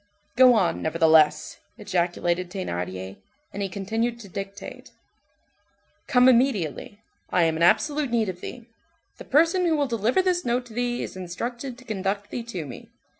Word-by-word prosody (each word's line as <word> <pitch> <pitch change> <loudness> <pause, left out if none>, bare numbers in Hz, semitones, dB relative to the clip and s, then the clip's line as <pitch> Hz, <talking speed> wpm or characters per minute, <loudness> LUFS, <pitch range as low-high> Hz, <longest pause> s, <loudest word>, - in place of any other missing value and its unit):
"Go 255 -1 +7
on, 190 -6 +1
nevertheless," 160 -1 +3 0.2
ejaculated 175 0 -1
Thénardier, 95 - -5 0.4
and 200 - -5
he 195 - -2
continued 225 +5 -2
to 205 - -11
dictate:— 195 +2 -8 1.2
"Come 250 -2 +5
immediately, 220 - +1 0.3
I 180 - +2
am 160 -1 +2
in 160 - -4
absolute 290 - +3
need 230 -2 +1
of 180 -1 -6
thee. 240 -2 -8 0.5
The - - -9
person 330 +6 +3
who 325 - +2
will 290 -1 +1
deliver 235 - +1
this 360 -1 +1
note 245 +1 -1
to 235 - -13
thee 245 +1 -1
is - - -7
instructed 235 +8 -5
to 255 - -16
conduct 200 -2 -3
thee 245 - -3
to 195 -9 -6
me. 125 -4 -10
210 Hz, 160 wpm, -25 LUFS, 175-245 Hz, 1.2 s, Go